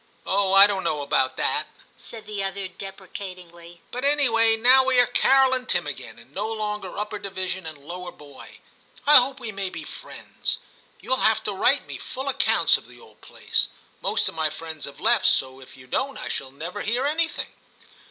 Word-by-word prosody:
'Oh, 195 0 +1
I 195 +1 +10
don't 200 -2 -1
know 150 -1 -1
about 130 -2 +1
that,' - - 0 0.3
said 225 -2 -10
the 205 -2 -4
other 195 0 -3
deprecatingly, 185 -3 -10
'but 250 +2 -4
anyway 230 -6 +3
now 255 +3 +6
we 260 -1 +3
are 245 - +7
Carol 265 +2 +4
and 255 -1 +2
Tim - - +1
again, - - -7
and - - -18
no 210 +3 -3
longer 210 -2 -4
upper 210 0 -3
division 185 -2 -3
and 155 -2 -7
lower 175 +5 -8
boy; 145 -2 -14 0.5
I 300 +1 +9
hope 260 +2 +3
we 230 -3 -5
may 195 -2 -3
be - - -7
friends. - - -6 0.4
You - - -8
will 260 - +3
have 220 -2 +3
to 210 - -2
write 255 +8 +2
me - - -8
full 265 +2 -5
accounts 270 - +3
of - - -15
the - - -15
old 460 - -19
place; - - -1 0.3
most - - +1
of - - -1
my 160 -1 0
friends 160 0 -7
have 140 0 -11
left, - - +3
so 130 0 +1
if 130 - -14
you 130 - -14
don't 265 - -2
I - - -6
shall 135 - -4
never 165 +9 -6
hear 245 +5 0
anything. 325 +3 -1
200 Hz, 200 wpm, -24 LUFS, 175-245 Hz, 0.5 s, I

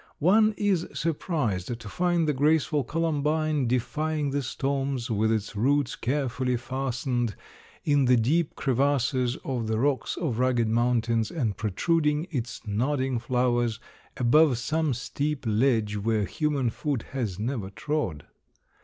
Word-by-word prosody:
One 215 +6 +4
is 195 -5 +1
surprised 135 - -1
to 115 - -10
find 175 +6 +1
the 150 - +2
graceful 150 +1 +2
Columbine, 155 -1 0
defying 150 +4 -1
the 145 +1 0
storms, 135 -1 -2
with 110 +1 +2
its 110 -1 -2
roots 140 +5 +1
carefully 125 -1 -1
fastened 120 -2 -2 0.5
in 145 -2 +3
the 125 0 +5
deep 145 +8 +1
crevasses 130 -2 +1
of 120 -4 -2
the 110 0 0
rocks 135 +3 0
of 130 -10 -2
rugged 125 -3 +2
mountains 115 -1 +1
and 120 - -1
protruding 150 - +1
its 120 -5 -4
nodding 130 +4 0
flowers 120 -2 0 0.4
above 130 +2 +4
some 155 +2 0
steep 140 +3 -3
ledge 110 -2 +2
where 105 0 0
human 140 - 0
foot 140 -1 -2
has 115 -9 -2
never 110 -3 -3
trod. 100 - -3
130 Hz, 130 wpm, -27 LUFS, 115-150 Hz, 0.5 s, the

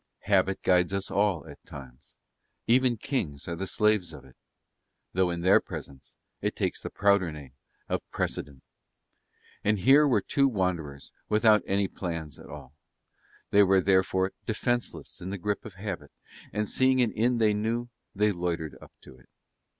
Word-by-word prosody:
Habit 95 -1 +1
guides 90 +1 +3
us 100 0 -3
all 100 -7 +1
at - - -13
times, 65 -1 -13 0.5
even 125 0 +3
kings 100 - -3
are 85 - -3
the 95 +3 -4
slaves 105 -3 +1
of - - -11
it 65 - -18 0.8
(though 95 0 +2
in 85 -1 -3
their 95 +3 +6
presence 70 -1 -9 0.3
it - - -1
takes - - -2
the - - -5
prouder 100 -4 +2
name 75 -4 -10 0.4
of - - -1
precedent); 70 -2 -4 1.0
and 105 +1 +2
here 135 +10 +6
were 115 -7 +3
two 140 +7 +2
wanderers 85 - -2 0.2
without 105 -1 +5
any 100 0 +1
plans 85 -7 -5
at - - -13
all; 65 - -10 0.8
they 100 - +6
were 95 -1 +5
therefore 95 0 +2 0.2
defenceless 120 +2 -2
in 90 - -5
the 100 - -4
grip 105 +2 -3
of 105 -4 -9
habit 95 -7 -6 0.4
and, 105 0 -1
seeing 130 +3 +3
an 120 -3 +3
inn 120 +2 +1
they 110 -2 +3
knew, 115 +3 -1 0.3
they 105 +1 +3
loitered 85 -5 -3
up - - -15
to 65 - -15
it. - - -24
95 Hz, 165 wpm, -28 LUFS, 85-110 Hz, 1.0 s, their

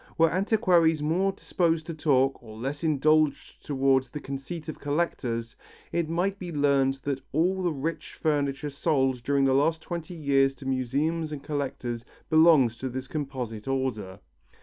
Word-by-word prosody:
Were 165 0 +4
antiquaries 180 -5 +3
more 180 +6 +1
disposed 165 -4 0
to 165 - -5
talk 135 -4 +2
or 110 -2 -11
less 135 +6 -4
indulgent 155 -1 +2
towards 135 -2 +1
the 150 - -6
conceit 140 +4 -6
of 155 - -6
collectors, 125 -7 -2 0.4
it 170 -2 -1
might 185 +4 0
be 175 -2 -6
learnt 140 -3 +2
that 140 -2 -2
all 180 +5 +1
the 175 -2 +1
rich 155 +3 -4
furniture 145 -2 -1
sold 135 -4 +1
during 140 +2 +2
the 135 - +3
last 160 +4 +2
twenty 170 0 -5
years 135 -3 +2
to 135 - -12
museums 140 +5 -1
and 145 -2 -6
collectors 130 -5 -3 0.3
belongs 155 -8 +5
to 130 - -3
this 130 +1 -5
composite 130 -7 -5
order. 125 -8 -2
145 Hz, 155 wpm, -27 LUFS, 135-165 Hz, 0.4 s, belongs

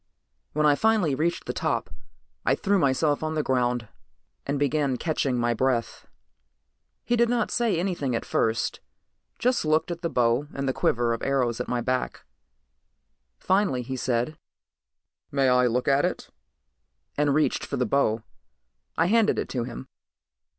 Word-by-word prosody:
When 150 0 +1
I 150 - +6
finally 215 -3 +2
reached 165 +5 -1
the - - -3
top, - - -2 0.5
I - - +3
threw 200 -1 +1
myself 145 0 +2
on 155 0 -2
the 155 - 0
ground 125 -3 0 0.6
and 140 +1 0
began 140 -2 +1
catching 140 -4 -1
my 120 0 +1
breath. 120 0 -1 1.0
He 240 - +2
didn't 235 -1 +1
say 230 -7 +1
anything 170 -9 -1
at - - -3
first, 115 0 0 0.6
just 250 0 +1
looked 155 +2 +1
at 170 0 -5
the 170 - -1
bow 125 +1 +1
and 140 0 -2
the 130 - +1
quiver 120 -1 +1
of 115 - -4
arrows 125 -4 0
on - - -5
my 120 -1 0
back. 130 +1 -2 1.1
Finally 190 -10 +1
he 130 +2 -5
said, 125 +3 -1 1.0
"May 135 -2 +2
I 125 0 +4
look 125 +1 -1
at 140 0 +3
it?" - - -2 0.9
and 145 -1 +2
reached 155 - +1
for 140 - -4
the 125 - +1
bow. 115 -2 +1 0.7
I 165 - +3
handed 220 +3 +3
it - - -2
to 120 -3 -2
him. 130 +1 -8
140 Hz, 155 wpm, -26 LUFS, 125-160 Hz, 1.1 s, I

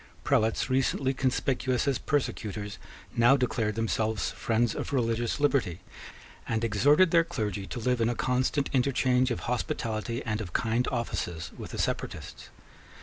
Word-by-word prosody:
Prelates 115 -6 +2
recently 130 +1 +1
conspicuous 130 0 0
as 135 -3 +1
persecutors 105 -8 -2 0.4
now 120 +4 +6
declared 115 -4 0
themselves 110 -3 0
friends 115 0 0
of - - -4
religious 120 -1 0
liberty, 140 - +1 0.7
and 110 0 -1
exhorted 145 - +4
their 170 -1 +5
clergy 105 - -3
to - - -5
live 125 +1 0
in 115 - +3
a 120 - -1
constant 130 +3 +1
interchange 130 -1 +2
of 120 - -2
hospitality 115 -1 -2
and 110 -2 -1
of 90 -6 -7
kind 115 +3 +1
offices 90 -9 -3
with - - -8
the - - -7
separatists. - - -4
120 Hz, 145 wpm, -28 LUFS, 110-130 Hz, 0.7 s, now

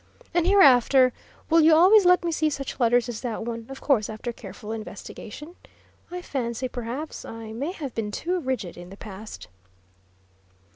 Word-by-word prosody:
And 345 0 +2
hereafter 265 - +6 0.3
will 330 0 +5
you 315 0 +6
always 380 +5 +7
let 360 0 +5
me 340 - 0
see 310 -1 +1
such 275 -2 -5
letters 240 0 +3
as 235 -3 -5
that 230 -3 -3
one 230 -1 -5
of 270 - -9
course 240 -8 +2
after 220 +2 -5
careful 220 -1 -9
investigation? 225 - -8 0.5
I 360 0 -6
fancy 250 -3 -3
perhaps 250 +5 -6
I 225 -1 -8
may 280 +9 -3
have 285 - -6
been 220 -2 -3
too 355 - -2
rigid 255 - -3
in 175 0 -10
the 195 - -11
past." 210 0 -9
255 Hz, 165 wpm, -25 LUFS, 225-315 Hz, 0.5 s, always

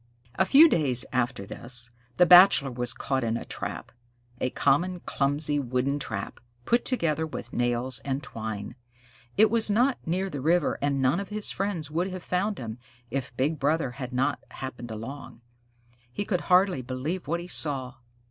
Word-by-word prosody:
A 190 - +2
few 300 +4 +8
days 135 - +1
after 120 -5 -1
this, 120 +3 -1 0.3
the 180 - +6
Bachelor 175 -6 +7
was 120 -1 -2
caught 130 +2 -2
in 115 0 0
a - - -7
trap - - -6 0.5
a 130 - 0
common, 175 +8 +1
clumsy, 145 +1 0
wooden 130 +2 -1
trap, 110 -7 -5 0.3
put 235 +1 +2
together 160 - 0
with - - -8
nails 120 +1 0
and 135 +1 -2
twine. 110 -4 -6 0.6
It 215 +1 +5
was 225 -2 +2
not 245 +6 +2
near 185 +4 0
the 145 -8 -5
river, 170 +5 +2
and 140 -1 0
none 135 +7 +2
of 200 - -6
his 210 0 -3
friends 185 -7 -3
would 170 +4 0
have 185 -1 -7
found 195 +3 -1
him, 115 -1 -6 0.3
if 125 -2 -4
Big 150 +3 0
Brother 145 -2 +1
had 125 0 -7
not 125 +2 0
happened 125 -2 -7
along. 115 +4 -8 0.7
He 205 +11 -3
could 180 -4 -1
hardly 185 -5 +3
believe 135 +8 -4
what 170 +3 -1
he 175 - -8
saw. 135 -7 0
140 Hz, 170 wpm, -27 LUFS, 125-180 Hz, 0.7 s, few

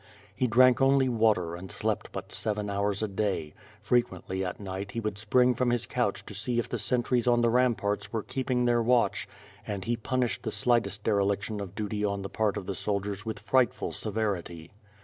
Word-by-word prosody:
He 125 - +1
drank 125 +2 +5
only 135 0 +4
water 110 -8 +2
and 90 +2 -8
slept - - -2
but - - -7
seven 105 -1 -1
hours 100 +1 0
a - - +1
day; 95 -6 -2 0.3
frequently 95 -5 0
at 90 - -4
night 100 +1 -5
he 115 - -2
would 105 -2 -3
spring 125 +4 +3
from 125 +1 0
his 120 -1 +1
couch 120 -5 -1
to - - -9
see 115 +4 -2
if 120 - 0
the - - -3
sentries 125 -1 +1
on 120 -1 +4
the 120 -1 +3
ramparts 105 -5 +1
were 110 -2 -2
keeping 125 -2 -1
their 120 -1 +3
watch 120 +1 +2 0.4
and 100 -3 -4
he 120 - +1
punished 125 +1 -1
the - - -3
slightest 105 -2 +1
dereliction 100 0 0
of 95 -1 -7
duty 105 -1 -3
on 100 -1 -1
the 100 - -5
part 110 -2 0
of - - -5
the 100 - -3
soldiers 100 +2 -3
with 110 - -3
frightful 130 -3 +1
severity. 100 -7 -2
110 Hz, 195 wpm, -28 LUFS, 100-120 Hz, 0.4 s, drank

